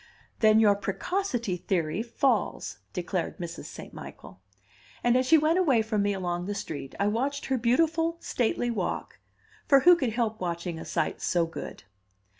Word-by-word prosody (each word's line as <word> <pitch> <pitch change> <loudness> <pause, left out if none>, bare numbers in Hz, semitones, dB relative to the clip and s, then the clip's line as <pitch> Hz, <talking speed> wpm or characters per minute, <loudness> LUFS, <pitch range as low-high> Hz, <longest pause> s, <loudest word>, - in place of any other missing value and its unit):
"Then 215 -1 +6
your 210 -2 +6
precocity 230 - -2
theory 175 +1 -1
falls," 240 +3 -1
declared 180 -1 -3
Mrs. 170 -1 -6
St. - - -10
Michael. 95 0 -11 0.6
And 240 0 +4
as 255 0 +2
she 320 - +7
went 315 +4 +3
away 270 -11 +3
from 215 -1 0
me 205 0 +1
along 180 -2 -2
the 205 - -2
street, 145 -8 -6
I 200 - +2
watched 265 +7 -1
her 265 - 0
beautiful 325 +7 +2
stately 240 -2 -1
walk; 230 - -3 0.5
for 275 -1 +6
who 355 +5 +8
could 260 -9 -1
help 220 -3 -1
watching 170 -1 -3
a - - -7
sight - - -2
so 170 -2 +1
good? 165 - -8
220 Hz, 165 wpm, -27 LUFS, 180-265 Hz, 0.6 s, who